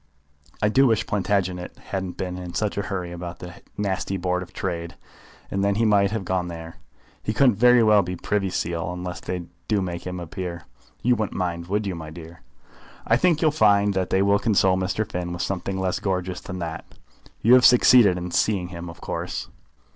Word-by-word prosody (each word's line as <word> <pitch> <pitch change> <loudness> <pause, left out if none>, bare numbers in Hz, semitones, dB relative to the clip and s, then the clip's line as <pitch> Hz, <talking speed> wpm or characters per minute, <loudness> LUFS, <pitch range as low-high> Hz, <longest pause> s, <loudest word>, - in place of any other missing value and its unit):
I 105 - +4
do 135 +5 +5
wish 110 -2 +2
Plantagenet 95 -3 -1
hadn't 95 -2 -5
been 90 -1 -3
in 90 -1 -7
such 105 -2 -1
a 100 - 0
hurry 90 -3 -4
about 85 0 -6
that 90 +2 -10 0.2
nasty 95 -1 -1
Board 90 0 -1
of 90 - -9
Trade, 85 -2 -4 0.6
and 100 0 0
then 100 0 +2
he 115 +2 +2
might 100 -2 +4
have 105 -2 -3
gone 90 -1 -1
there. 80 -1 -8 0.4
He 110 - -2
couldn't 125 -3 +4
very 125 +1 +6
well 105 -2 +6
be 90 0 -4
Privy 100 +2 -1
Seal, 85 -1 -2
unless 90 0 -5
they 90 -1 -4 0.2
do 105 -2 +2
make 90 -2 -4
him 90 0 -4
a 85 - -5
peer. 85 -1 -6 0.4
You 125 +1 +4
wouldn't 110 -3 -3
mind, 85 -2 -2
would 105 +3 -1
you, 95 - -2
my 80 -2 -7
dear?" 85 +1 -11 0.6
"I 115 - +4
think 170 +3 +2
you'll 155 - +4
find 105 -6 +4
that 95 -1 -1
they 95 +1 +2
will 100 +1 +3
console 95 -4 +3
Mr. 95 +3 -1
Finn 90 -4 -4
with 85 0 -3
something 95 +1 -3
less 95 -1 -1
gorgeous 90 -2 -2
than 95 -1 -7
that. 80 -2 -5 0.6
You 120 - +6
have 125 0 +7
succeeded 120 -6 +7
in 90 0 -5
seeing 95 -3 +1
him, 85 -1 -7
of 85 - -12
course?" - - -4
95 Hz, 205 wpm, -24 LUFS, 90-105 Hz, 0.6 s, have